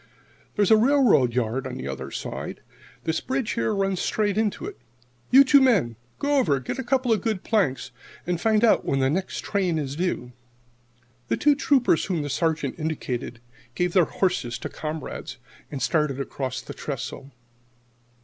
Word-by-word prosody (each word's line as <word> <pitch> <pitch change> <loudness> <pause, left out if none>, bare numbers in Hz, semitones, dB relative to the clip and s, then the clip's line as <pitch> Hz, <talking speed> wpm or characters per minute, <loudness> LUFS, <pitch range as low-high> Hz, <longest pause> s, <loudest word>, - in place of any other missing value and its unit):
There's 205 -2 +2
a 220 - +8
railroad 235 - +4
yard 125 +2 -1
on 130 - -6
the 65 - -5
other 65 -1 -5
side. - - -6 0.4
This 160 0 -1
bridge, 260 -3 -2
here, 230 - 0
runs 195 -2 0
straight 205 0 0
into 215 - -1
it. 405 0 -8 0.5
You 270 +2 +8
two 275 +1 +6
men 200 - +3 0.2
go 285 0 +1
over, 145 - +2
get 130 - -5
a - - -2
couple 255 0 +1
of 215 - 0
good 220 -5 -2
planks, 135 - 0 0.3
and 175 -1 -2
find 220 0 +3
out 230 - +4
when 135 - 0
the 135 0 +2
next 185 +4 -2
train 185 -5 0
is 140 -2 -3
due." 160 -7 -2 1.0
The - - 0
two 295 0 +4
Troopers 275 - +2
whom 175 -6 -1
the 145 - -4
Sergeant 160 -2 -1
indicated 130 -6 -4 0.3
gave 180 -1 0
their 180 -4 +5
horses 150 -13 -1
to - - -6
a - - -22
comrade 155 - -5 0.4
and 135 -4 -4
started 150 -2 +1
away 140 - -1
across 130 -3 -4
the - - -9
trestle. 135 -1 -6
175 Hz, 180 wpm, -25 LUFS, 135-220 Hz, 1.0 s, a